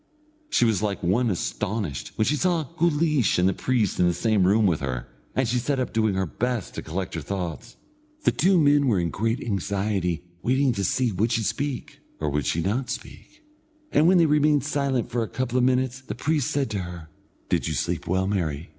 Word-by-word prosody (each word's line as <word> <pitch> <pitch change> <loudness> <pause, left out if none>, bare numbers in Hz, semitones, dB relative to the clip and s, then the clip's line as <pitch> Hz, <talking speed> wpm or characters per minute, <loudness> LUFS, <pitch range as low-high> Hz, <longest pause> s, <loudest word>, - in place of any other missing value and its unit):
She 120 - +3
was 110 -5 +2
like 100 -2 -2
one 115 +8 +2
astonished 95 - -3
when 110 - +1
she 150 - +2
saw 170 0 +1 0.2
Guleesh 155 - +2
and 90 +1 +3
the 95 - +2
priest 120 -1 0
in 90 - +4
the 85 - +1
same 105 -5 +2
room 105 +3 +4
with 85 -5 +2
her, 65 -3 -4 0.3
and 130 -1 +1
she 125 +2 +1
sat 135 +2 -1
up 130 - -2
doing 110 -3 +1
her 95 0 0
best 120 +4 -3
to - - -5
collect 90 +4 -4
her 80 - -3
thoughts. 90 0 -5 0.5
The - - +4
two 185 0 +3
men 145 -2 +4
were 105 -7 +3
in 85 -1 -1
great 115 +3 -1
anxiety 100 -4 -1 0.2
waiting 130 +4 +2
to 100 - -2
see 125 +4 +1
would 105 +5 0
she 115 -1 +1
speak, 125 +4 -3 0.2
or 75 -2 -1
would 75 -2 -1
she 85 - 0
not 115 +6 -1
speak, 305 - -8 0.5
and 155 - +4
when 185 +1 +6
they 170 - +5
remained 150 -2 +3
silent 140 -4 -1
for 120 - 0
a 110 - -1
couple 130 +1 -1
of - - +2
minutes, 130 0 +1
the 105 -5 -6
priest 145 +1 0
said 140 -2 -1
to 100 - -1
her: 90 -3 -7 0.4
"Did - - +1
you 80 - -2
sleep 85 +1 -2
well, 95 +2 +1
Mary?" 85 -6 -2
110 Hz, 215 wpm, -25 LUFS, 90-130 Hz, 0.5 s, when